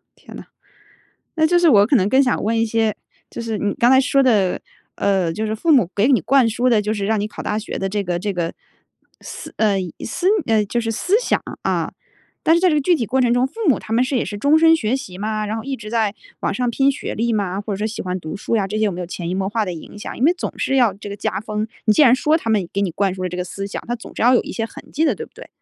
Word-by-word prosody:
天 -, -, -14 dB
呐。 -, -, -10 dB, 0.9 s
那 315 Hz, -, +5 dB
就 350 Hz, +2 st, +3 dB
是 345 Hz, -1 st, +4 dB
我 205 Hz, -8 st, +6 dB
可 275 Hz, -, +1 dB
能 195 Hz, -3 st, +2 dB
更 265 Hz, +5 st, +4 dB
想 255 Hz, -2 st, 0 dB
问 225 Hz, +2 st, +1 dB
一 225 Hz, -, +3 dB
些， 225 Hz, -1 st, 0 dB, 0.3 s
就 -, -, -6 dB
是 225 Hz, -2 st, -3 dB
你 205 Hz, 0 st, -1 dB
刚 240 Hz, -, +3 dB
才 265 Hz, 0 st, +6 dB
说 275 Hz, 0 st, +2 dB
的， 210 Hz, -8 st, +2 dB, 0.4 s
呃， 190 Hz, -4 st, +1 dB
就 215 Hz, +6 st, -3 dB
是 215 Hz, -, -2 dB
父 270 Hz, +10 st, -1 dB
母 240 Hz, -, +4 dB
给 205 Hz, +2 st, +3 dB
你 265 Hz, -4 st, +5 dB
灌 260 Hz, -, +3 dB
输 240 Hz, +3 st, 0 dB
的 225 Hz, -3 st, +4 dB
就 210 Hz, +1 st, -1 dB
是 205 Hz, -2 st, -3 dB
让 220 Hz, 0 st, +1 dB
你 210 Hz, -, -2 dB
考 -, -, -8 dB
大 210 Hz, -, -1 dB
学 220 Hz, -, -5 dB
的 195 Hz, -, -2 dB
这 205 Hz, +1 st, -1 dB
个 175 Hz, -1 st, -1 dB
这 200 Hz, +3 st, -2 dB
个 170 Hz, -2 st, -3 dB, 0.7 s
思 -, -, -9 dB
呃， 210 Hz, -3 st, +3 dB, 0.3 s
思 350 Hz, +10 st, -1 dB, 0.2 s
呃， 220 Hz, -2 st, +2 dB
就 235 Hz, +4 st, -1 dB
是 225 Hz, -1 st, -2 dB
思 370 Hz, -, +1 dB
想， -, -, 0 dB, 0.2 s
啊。 -, -, -1 dB, 0.5 s
但 325 Hz, -, +5 dB
是 340 Hz, -, +3 dB
在 370 Hz, -, +4 dB
这 310 Hz, -, +2 dB
个 -, -, +3 dB
具 350 Hz, +6 st, +3 dB
体 255 Hz, -, -1 dB
过 260 Hz, +6 st, +1 dB
程 240 Hz, -1 st, +3 dB
中， 245 Hz, +1 st, +2 dB
父 265 Hz, -, -15 dB
母 275 Hz, -, +4 dB
他 220 Hz, -, -8 dB
们 235 Hz, +2 st, +3 dB
是 260 Hz, +1 st, -1 dB
也 240 Hz, -, 0 dB
是 205 Hz, -, -6 dB
终 285 Hz, +8 st, +4 dB
身 325 Hz, 0 st, +6 dB
学 235 Hz, -3 st, 0 dB
习 190 Hz, -10 st, -8 dB
吗？ 215 Hz, +1 st, -2 dB
然 215 Hz, +2 st, -3 dB
后 225 Hz, -, -6 dB
一 275 Hz, -, -3 dB
直 215 Hz, -2 st, -9 dB
在 220 Hz, -3 st, 0 dB, 0.3 s
网 -, -, -1 dB
上 245 Hz, +3 st, 0 dB
拼 270 Hz, +3 st, +2 dB
学 -, -, -5 dB
历 235 Hz, +2 st, 0 dB
吗？ 200 Hz, -3 st, -1 dB
或 205 Hz, 0 st, -5 dB
者 -, -, -6 dB
说 210 Hz, -, -1 dB
喜 220 Hz, -, -5 dB
欢 185 Hz, 0 st, -3 dB
读 155 Hz, -1 st, -6 dB
书 210 Hz, -, -3 dB
呀， 200 Hz, -3 st, +1 dB
这 210 Hz, +2 st, -3 dB
些 215 Hz, -, +2 dB
有 205 Hz, -, +1 dB
没 180 Hz, -, -6 dB
有 180 Hz, -, -4 dB
潜 170 Hz, 0 st, -5 dB
移 180 Hz, -, -2 dB
默 190 Hz, 0 st, -1 dB
化 220 Hz, +1 st, 0 dB
的 185 Hz, -, -4 dB
影 170 Hz, +5 st, -11 dB
响， 210 Hz, -, -7 dB
因 245 Hz, -, 0 dB
为 325 Hz, -, +6 dB
总 360 Hz, -, -6 dB
是 270 Hz, -, 0 dB
要 240 Hz, -7 st, +3 dB
这 205 Hz, +1 st, -9 dB
个 200 Hz, -, -6 dB
加 195 Hz, -, -2 dB
分。 215 Hz, 0 st, -3 dB, 0.2 s
你 215 Hz, -, +5 dB
既 300 Hz, -, +4 dB
然 250 Hz, -4 st, +7 dB
说 300 Hz, +4 st, +2 dB
他 230 Hz, -, -6 dB
们 210 Hz, -5 st, +1 dB
给 200 Hz, -, -1 dB
你 185 Hz, -4 st, -1 dB
灌 195 Hz, +2 st, 0 dB
输 185 Hz, -1 st, -5 dB
了 -, -, -1 dB
这 180 Hz, -, -6 dB
个 180 Hz, -, -1 dB
思 195 Hz, +2 st, -6 dB
想， 200 Hz, -, -6 dB
他 240 Hz, -, -1 dB
总 230 Hz, -, -12 dB
是 -, -, -3 dB
要 245 Hz, +2 st, +5 dB
有 245 Hz, -, +4 dB
一 -, -, -7 dB
些 225 Hz, -, -2 dB
痕 225 Hz, -, -10 dB
迹 310 Hz, -, +1 dB
的， -, -, +2 dB
对 -, -, -7 dB
不 -, -, -27 dB
对？ -, -, -12 dB
220 Hz, 330 characters per minute, -20 LUFS, 200-255 Hz, 0.9 s, 然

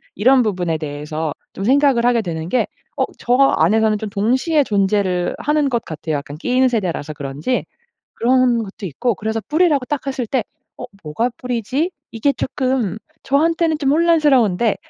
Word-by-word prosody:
이런 255 Hz, +6 st, +4 dB
부분에 180 Hz, -7 st, -1 dB
대해서 150 Hz, +1 st, -4 dB, 0.2 s
좀 195 Hz, -, -6 dB
생각을 270 Hz, -2 st, +3 dB
하게 240 Hz, -2 st, +3 dB
되는 165 Hz, -3 st, -5 dB
게 255 Hz, -, +1 dB, 0.3 s
어 -, -, +2 dB, 0.2 s
저 245 Hz, -, 0 dB
안에서는 220 Hz, -4 st, +3 dB
좀 210 Hz, 0 st, -5 dB
동시에 255 Hz, -, +1 dB
존재를 195 Hz, -5 st, 0 dB
하는 300 Hz, -1 st, +1 dB
것 235 Hz, -3 st, -1 dB
같아요. 155 Hz, -1 st, -4 dB
약간 145 Hz, +1 st, -6 dB
끼인 255 Hz, +7 st, +2 dB
세대라서 180 Hz, -10 st, -2 dB
그런지. 145 Hz, -, -3 dB, 0.5 s
그런 245 Hz, -1 st, +2 dB
것도 200 Hz, 0 st, -9 dB
있고 225 Hz, -, -1 dB
그래서 220 Hz, +2 st, -2 dB
뿌리라고 305 Hz, -5 st, +2 dB
딱 285 Hz, +1 st, -3 dB
했을 265 Hz, -2 st, -2 dB
때 255 Hz, -3 st, 0 dB, 0.3 s
'어 -, -, -8 dB, 0.2 s
뭐가 225 Hz, +12 st, -1 dB
뿌리지?' 250 Hz, -, -2 dB, 0.2 s
이게 275 Hz, +5 st, +1 dB
쪼끔 255 Hz, -7 st, -1 dB, 0.3 s
저한테는 320 Hz, +3 st, +2 dB
좀 275 Hz, -2 st, +1 dB
혼란스러운데 280 Hz, -, +3 dB
235 Hz, 340 characters per minute, -19 LUFS, 185-270 Hz, 0.5 s, 이런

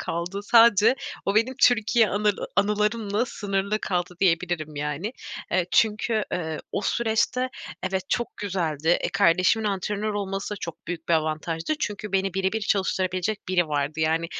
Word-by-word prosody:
kaldı. 175 Hz, +4 st, -3 dB
Sadece 230 Hz, +1 st, +6 dB, 0.3 s
o 195 Hz, -, +1 dB
benim 230 Hz, +5 st, +2 dB
Türkiye 230 Hz, -1 st, +4 dB
anıl 205 Hz, 0 st, +1 dB, 0.2 s
anılarımla 210 Hz, +1 st, +1 dB
sınırlı 200 Hz, -2 st, -2 dB
kaldı, 180 Hz, -1 st, -2 dB
diyebilirim 165 Hz, -4 st, 0 dB
yani. 150 Hz, +9 st, -3 dB, 0.4 s
Eee, 180 Hz, -1 st, +2 dB
çünkü, 215 Hz, 0 st, +2 dB
eee, 160 Hz, -3 st, -2 dB
o 200 Hz, -, -1 dB
süreçte, 235 Hz, +3 st, +1 dB, 0.3 s
evet, 190 Hz, 0 st, -2 dB
çok 240 Hz, +1 st, -2 dB
güzeldi. 165 Hz, -6 st, -2 dB
E, -, -, -1 dB
kardeşimin 185 Hz, +6 st, +3 dB
antrenör 205 Hz, +2 st, -2 dB
olması 195 Hz, 0 st, -3 dB
çok 170 Hz, -, -7 dB
büyük 170 Hz, -1 st, -6 dB
bir 170 Hz, -, +4 dB
avantajdı. 160 Hz, -, -1 dB
Çünkü 210 Hz, -1 st, -4 dB
beni 195 Hz, -1 st, 0 dB
bire 190 Hz, 0 st, 0 dB
bir 220 Hz, -, -1 dB
çalıştırabilecek 190 Hz, -1 st, -1 dB
biri 175 Hz, -3 st, +2 dB
vardı. 150 Hz, +1 st, -1 dB
Yani, 160 Hz, +1 st, +1 dB
195 Hz, 145 wpm, -25 LUFS, 170-210 Hz, 0.4 s, Sadece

